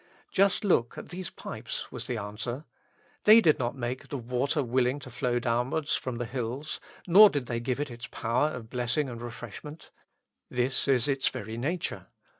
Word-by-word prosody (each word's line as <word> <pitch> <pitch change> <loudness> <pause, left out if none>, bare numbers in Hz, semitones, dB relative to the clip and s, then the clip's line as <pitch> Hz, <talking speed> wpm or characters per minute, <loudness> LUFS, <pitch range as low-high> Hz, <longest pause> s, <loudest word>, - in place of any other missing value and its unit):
Just 195 +2 +3
look 120 - +2
at - - -8
these 180 0 -5
pipes - - -6
was - - -5
the 120 - -2
answer; 115 +7 -4 0.6
they 215 +2 +10
did 160 -9 +4
not 120 0 -1
make 125 +1 -4
the 140 - -4
water 125 +5 0
willing 125 +2 +1
to 130 -3 -10
flow 120 0 0
downwards 125 +6 0
from 130 -2 -3
the 120 - -2
hills, 125 +4 -4 0.3
nor 200 +4 +9
did 145 -7 -2
they 120 -1 -2
give 125 +2 -2
it 145 -2 -2
its 120 +1 -8
power 120 +6 +1
of 125 -7 -7
blessing 125 +3 0
and 115 -1 -7
refreshment; 120 +6 -8 0.6
this 125 +3 +1
is 135 -1 +4
its 135 -2 +2
very 115 -3 -6
nature. 155 +9 -3
125 Hz, 180 wpm, -29 LUFS, 120-145 Hz, 0.6 s, they